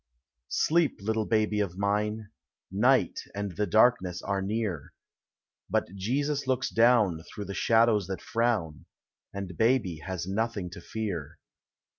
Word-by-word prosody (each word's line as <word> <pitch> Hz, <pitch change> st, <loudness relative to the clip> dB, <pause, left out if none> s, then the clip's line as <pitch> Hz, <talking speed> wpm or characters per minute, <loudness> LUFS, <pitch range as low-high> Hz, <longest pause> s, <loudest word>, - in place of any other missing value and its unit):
Sleep, 165 Hz, -1 st, +2 dB
little 110 Hz, +2 st, -1 dB
baby 110 Hz, -1 st, +1 dB
of 95 Hz, -3 st, -2 dB
mine, 105 Hz, +1 st, -1 dB, 0.4 s
Night 125 Hz, +7 st, +3 dB, 0.2 s
and 100 Hz, -3 st, -4 dB
the 105 Hz, 0 st, 0 dB
darkness 110 Hz, -6 st, +3 dB
are 100 Hz, -1 st, -1 dB
near, 100 Hz, -6 st, -3 dB, 0.8 s
Uut 95 Hz, -, 0 dB
Jesus 140 Hz, +8 st, -1 dB
looks 130 Hz, 0 st, 0 dB
down 115 Hz, -8 st, +4 dB
Through 100 Hz, +4 st, -8 dB
the 100 Hz, -, -5 dB
shadows 115 Hz, -2 st, +3 dB
that 95 Hz, -1 st, -4 dB
frown, 110 Hz, -, -1 dB, 0.5 s
And 100 Hz, -3 st, -6 dB
baby 110 Hz, -7 st, +2 dB
has 90 Hz, +1 st, -5 dB
nothing 100 Hz, -2 st, -2 dB
to 90 Hz, -, -9 dB
fear. 85 Hz, -8 st, -5 dB
105 Hz, 130 wpm, -28 LUFS, 95-115 Hz, 0.8 s, down